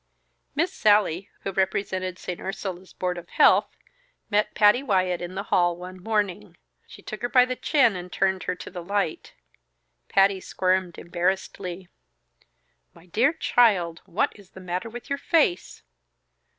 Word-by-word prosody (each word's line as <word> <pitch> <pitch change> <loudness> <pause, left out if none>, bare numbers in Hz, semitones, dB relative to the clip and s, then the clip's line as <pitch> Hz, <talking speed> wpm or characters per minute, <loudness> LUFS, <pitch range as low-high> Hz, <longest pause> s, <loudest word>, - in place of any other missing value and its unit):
Miss 335 +4 0
Sallie, 205 -3 +2
who 195 - -3
represented 190 -1 -1
St. 180 -2 -6
Ursula's 190 -1 -6
board 180 -1 -3
of 170 - -14
health, - - +4 0.5
met 210 +1 +1
Patty 210 +4 +5
Wyatt 185 -8 +1
in 175 +1 -6
the 195 - -3
hall 175 -1 +3
one 185 +1 -9
morning. 210 -3 -2 0.3
She - - -14
took 215 - -7
her 245 - -1
by 250 -1 +6
the 255 0 -3
chin 250 -7 +3
and 180 0 -7
turned 190 -1 0
her 180 - -1
to - - -10
the 180 -1 -6
light. 195 -2 -2 0.7
Patty 195 0 +4
squirmed 185 -1 -1
embarrassedly. 180 +1 -3 1.1
"My 165 - -17
dear 230 - +2
child! 205 - +2
What 185 - 0
is 200 -3 -17
the - - -13
matter 185 +4 -4
with 240 +1 -9
your 280 0 -2
face?" 300 - +1
190 Hz, 150 wpm, -25 LUFS, 180-210 Hz, 1.1 s, by